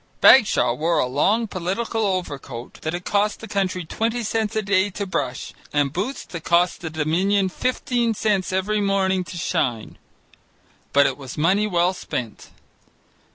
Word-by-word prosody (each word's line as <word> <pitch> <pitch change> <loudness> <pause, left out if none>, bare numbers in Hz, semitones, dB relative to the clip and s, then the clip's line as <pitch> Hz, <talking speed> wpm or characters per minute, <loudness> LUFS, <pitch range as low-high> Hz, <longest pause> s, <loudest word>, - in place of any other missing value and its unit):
Bagshaw 215 - +6
wore 165 +7 0
a - - +3
long 195 - +1
political 210 +3 -2
overcoat 145 -10 -5
that 160 +2 -2
it 180 - -7
cost 205 0 +1
the 225 - -9
country 185 -4 -1
twenty 230 +7 -2
cents 220 0 -1
a 220 - 0
day 200 0 +2
to 200 +1 -4
brush, 130 -9 -3 0.2
and 145 -2 +1
boots 205 - -3
that 170 -2 -8
cost 175 +1 +2
the 165 - -4
Dominion 180 +6 +1
fifteen 240 +1 -1
cents 205 -4 0
every 200 +3 0
morning 190 -2 +1
to 175 0 -9
shine. 125 -9 -2 0.9
But 140 0 +5
it - - -1
was 130 -3 -8
money 190 +7 +2
well 180 -1 +2
spent. 120 - -6
185 Hz, 155 wpm, -22 LUFS, 160-210 Hz, 0.9 s, Bagshaw